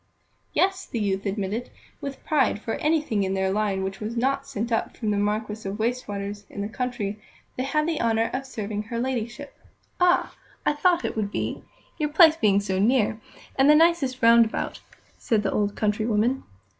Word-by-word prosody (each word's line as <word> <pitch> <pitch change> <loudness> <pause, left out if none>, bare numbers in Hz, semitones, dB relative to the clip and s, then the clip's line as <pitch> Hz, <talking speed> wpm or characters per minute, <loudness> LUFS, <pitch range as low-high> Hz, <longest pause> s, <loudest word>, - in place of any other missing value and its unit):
Yes, 380 0 +1
the - - -4
youth 195 -1 -1
admitted 205 +4 -3 0.3
with 280 -1 -7
pride, 270 -9 +2
for 225 +1 -4
anything 300 -9 +1
in 190 0 0
their 190 0 +1
line 200 -2 0
which 190 0 -4
was 220 +2 -4
not 275 +3 0
sent 225 +3 -4
up 225 - -1
from 215 -3 -1
the 205 - +1
Marquis 210 0 -2
of 200 - -5
Wastwater's, 205 -3 -3
in 200 - -6
the - - -2
country, 220 -3 -3 0.3
they - - -2
had 305 +3 +1
the 325 -3 -1
honour 225 0 +1
of 270 +1 -3
serving 210 -4 -4
her 225 +2 -5
Ladyship. 255 +2 -3 0.5
"Ah! 360 0 +3 0.3
I - - +3
thought 350 +3 +2
how - - 0
it - - -8
would 210 -2 -1
be, - - -3 0.4
your 300 -1 0
place 315 +1 +7
being 205 -10 +3
so 190 -2 -1
near, 215 0 +2 0.4
and 270 +2 +4
the 300 - +8
nicest 305 -6 +3
round 230 0 +8
about," 220 - -4 0.4
said 215 -3 +1
the 195 - 0
old 205 -1 0
country 215 +1 0
woman. 235 +4 +1
225 Hz, 195 wpm, -25 LUFS, 205-270 Hz, 0.5 s, the